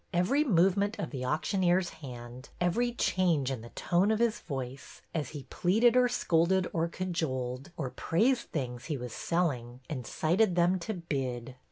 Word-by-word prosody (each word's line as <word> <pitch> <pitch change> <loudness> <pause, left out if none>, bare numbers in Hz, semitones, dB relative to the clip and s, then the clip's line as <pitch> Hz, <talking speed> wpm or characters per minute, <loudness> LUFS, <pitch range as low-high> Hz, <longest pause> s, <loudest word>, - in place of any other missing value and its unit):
Every 210 +12 +3
movement 200 - +3
of - - -4
the 130 -4 -4
auctioneer's 175 +5 +1
hand, 125 -1 -9
every 230 +8 +1
change 170 - +1
in 130 -4 -4
the 120 - -10
tones 180 - +1
of 220 - +2
his 235 0 +1
voice, 135 -2 -7
as 150 -5 -2
he 145 -3 -7
pleaded 225 +7 +3
or 250 -1 +5
scolded 180 -5 +2
or 165 -1 +1
cajoled, 140 -8 -3
or 135 -5 -3
praised 235 +10 +1
the 160 - 0
things 125 -2 -5
he 150 -4 -2
was 125 -2 -6
selling, 130 -9 -1
incited 170 - +1
them 175 +2 +3
to 215 +5 -4
bid. 130 -7 -3
170 Hz, 165 wpm, -30 LUFS, 130-190 Hz, -, or